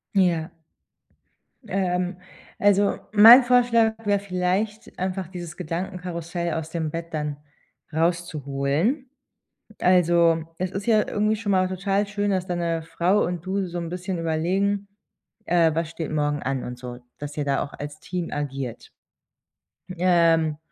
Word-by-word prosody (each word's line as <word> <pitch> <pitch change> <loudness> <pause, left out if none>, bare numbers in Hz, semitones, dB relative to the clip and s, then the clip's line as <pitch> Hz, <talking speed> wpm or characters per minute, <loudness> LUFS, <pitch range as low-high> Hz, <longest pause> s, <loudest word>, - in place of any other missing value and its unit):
Ja. 175 -3 +2 1.2
Ähm, 180 -1 -1 0.4
also 205 0 +3
mein 225 +5 +10
Vorschlag 240 -2 +4
wäre 205 -1 +2
vielleicht 195 +3 -2
einfach 185 -1 -2
dieses 175 -2 -8
Gedankenkarussell 175 -1 -4
aus 160 -1 -4
dem 160 -1 -2
Bett 165 0 -6
dann 150 -2 -3 0.6
rauszuholen. 165 - 0 0.7
Also, 170 -2 +4
es 185 0 -2
ist 195 +2 -5
ja 215 -2 +3
irgendwie 215 +1 +1
schon 205 -2 -2
mal 185 -1 +3
total 195 +2 0
schön, 205 0 -1
dass 185 -1 0
deine 170 -2 -1
Frau 170 +5 +1
und 175 -1 -3
du 195 0 -1
so 175 0 -5
'n 170 -1 -4
bisschen 180 +1 -4
überlegen, 190 +5 0 0.6
äh, 165 -3 +3
was 165 -1 -1
steht 160 -1 -5
morgen 145 -1 0
an 135 -1 -2
und 125 0 -7
so. 125 -1 -8 0.2
Dass 145 +1 -7
ihr 150 - -1
da 140 -1 0
auch 140 - -7
als 145 +1 -7
Team 180 -2 -4
agiert. 135 -4 -4 1.1
Ähm, 165 -3 +3
175 Hz, 140 wpm, -24 LUFS, 160-195 Hz, 1.2 s, mein